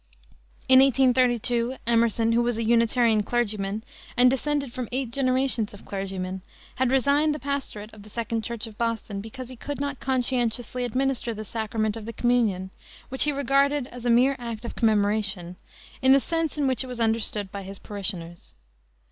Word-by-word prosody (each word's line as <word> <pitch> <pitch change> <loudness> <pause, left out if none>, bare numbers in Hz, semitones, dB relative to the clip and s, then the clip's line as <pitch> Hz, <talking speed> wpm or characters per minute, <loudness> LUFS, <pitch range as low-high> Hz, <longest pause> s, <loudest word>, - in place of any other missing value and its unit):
In 260 0 +8
1832 250 -2 +3
Emerson, 230 -1 +2
who 235 +1 +3
was 240 -1 0
a 230 - -1
Unitarian 230 -1 +3
clergyman, 210 -2 -1 0.3
and 250 0 +6
descended 280 -1 -1
from 250 -3 -4
eight 255 -1 -2
generations 255 -4 +1
of 205 - -15
clergymen, 190 -1 -4 0.4
had 260 -1 +2
resigned 280 +3 +3
the - - -6
pastorate 265 -6 -4
of 215 - -12
the 210 - -14
Second 230 +1 -2
Church 235 -1 -4
of 220 -2 -12
Boston 225 -3 -2
because 240 +4 -8
he 255 - -10
could 285 +4 -6
not 285 -1 -3
conscientiously 250 -1 0
administer 250 -1 -1
the 215 +1 -6
sacrament 220 0 -2
of 225 -2 -7
the 230 - -5
communion 220 -7 +1 0.4
which 265 +2 +2
he 300 - +2
regarded 280 0 +2
as 245 -1 -9
a 245 - 0
mere 250 +4 +4
act 235 -1 -6
of - - -6
commemoration 205 -5 +1 0.5
in 260 0 +6
the 275 - +6
sense 325 +1 -2
in 290 - +1
which 260 -1 +1
it - - -8
was 250 -1 -6
understood 220 -3 0
by 200 - -5
his 195 +1 -8
parishioners. 185 -5 -5
235 Hz, 175 wpm, -25 LUFS, 215-260 Hz, 0.5 s, In